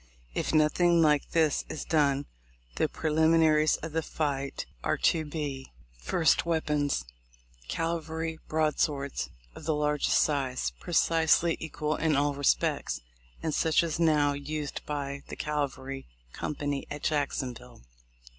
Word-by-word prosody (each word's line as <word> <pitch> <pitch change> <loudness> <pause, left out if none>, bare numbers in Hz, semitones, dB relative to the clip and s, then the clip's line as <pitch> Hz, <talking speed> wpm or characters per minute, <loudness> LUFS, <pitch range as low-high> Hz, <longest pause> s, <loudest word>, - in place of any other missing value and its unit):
If - - -1
nothing 170 +3 +4
like 150 -2 +3
this 160 -3 +2
is 155 - -5
done, 145 -3 +2 0.5
the - - +2
preliminaries 160 -1 +3
of 160 - -4
the 160 +1 0
fight 140 -3 -2 0.2
are - - +1
to 160 - +2
be: 145 -3 -5 0.3
1st. 160 - +3
Weapons: 150 - 0 0.3
— - - -29
Cavalry 160 - -2
broadswords 150 -3 0 0.2
of 155 - -11
the 155 -1 +1
largest 150 -1 +2
size, 135 -4 +1
precisely 165 -1 +3
equal 155 -1 -2
in 160 -2 +2
all 145 +1 +2
respects, 140 - +1 0.4
and 160 - -1
such 160 +3 +3
as 165 -1 -2
now 150 -3 +3
used 145 +1 -4
by 140 -1 -3
the - - -7
cavalry 135 -2 -3 0.3
company 145 -2 -3
at 145 0 -6
Jackson 140 -4 0
ville. 85 - -14
150 Hz, 130 wpm, -29 LUFS, 140-160 Hz, 0.5 s, nothing